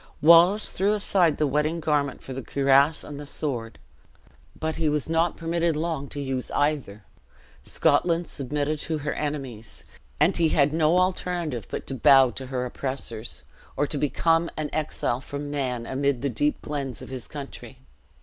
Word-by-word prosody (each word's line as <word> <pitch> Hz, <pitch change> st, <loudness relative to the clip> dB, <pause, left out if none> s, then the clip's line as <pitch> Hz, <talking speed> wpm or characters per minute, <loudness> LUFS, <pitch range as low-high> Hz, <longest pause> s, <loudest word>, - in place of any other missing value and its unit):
Wallace 170 Hz, +6 st, +6 dB
threw 200 Hz, +3 st, +1 dB
aside 185 Hz, -6 st, +2 dB
the 155 Hz, -, +2 dB
wedding 150 Hz, +4 st, 0 dB
garment 150 Hz, -4 st, -1 dB
for 135 Hz, -, -7 dB
the 135 Hz, -, -5 dB
cuirass 140 Hz, +3 st, +3 dB
and 145 Hz, -1 st, -8 dB
the 145 Hz, -, -7 dB
sword. 120 Hz, -7 st, -3 dB, 0.8 s
But 160 Hz, 0 st, -2 dB
he 160 Hz, -2 st, +1 dB
was 150 Hz, -1 st, -1 dB
not 165 Hz, +1 st, +1 dB
permitted 165 Hz, 0 st, 0 dB
long 155 Hz, -3 st, -2 dB
to 145 Hz, -, -6 dB
use 135 Hz, -2 st, -3 dB
either 140 Hz, -9 st, -1 dB, 0.6 s
Scotland 170 Hz, -1 st, +1 dB
submitted 145 Hz, +2 st, -2 dB
to 160 Hz, +1 st, -3 dB
her 145 Hz, 0 st, -3 dB
enemies; 135 Hz, -7 st, -5 dB, 0.3 s
and 165 Hz, +6 st, +4 dB
he 165 Hz, -2 st, +3 dB
had 145 Hz, -1 st, +3 dB
no 160 Hz, +2 st, +3 dB
alternative 180 Hz, -, -1 dB
but -, -, -5 dB
to -, -, -5 dB
bow 135 Hz, 0 st, +6 dB
to 130 Hz, +1 st, -7 dB
her 125 Hz, -1 st, -2 dB
oppressors, 125 Hz, -3 st, -4 dB, 0.3 s
or 145 Hz, -, +2 dB
to 145 Hz, 0 st, -2 dB
become 165 Hz, +3 st, +2 dB
an 155 Hz, -1 st, -3 dB
exile 145 Hz, -5 st, -1 dB
from 145 Hz, +1 st, -6 dB
man, 125 Hz, -5 st, -2 dB
amid 135 Hz, -1 st, -1 dB
the 140 Hz, -, +1 dB
deep 145 Hz, +5 st, -1 dB
glens 140 Hz, -4 st, -4 dB
of -, -, -10 dB
his 130 Hz, -2 st, -6 dB
country. 135 Hz, -4 st, -9 dB
145 Hz, 170 wpm, -25 LUFS, 135-160 Hz, 0.8 s, Wallace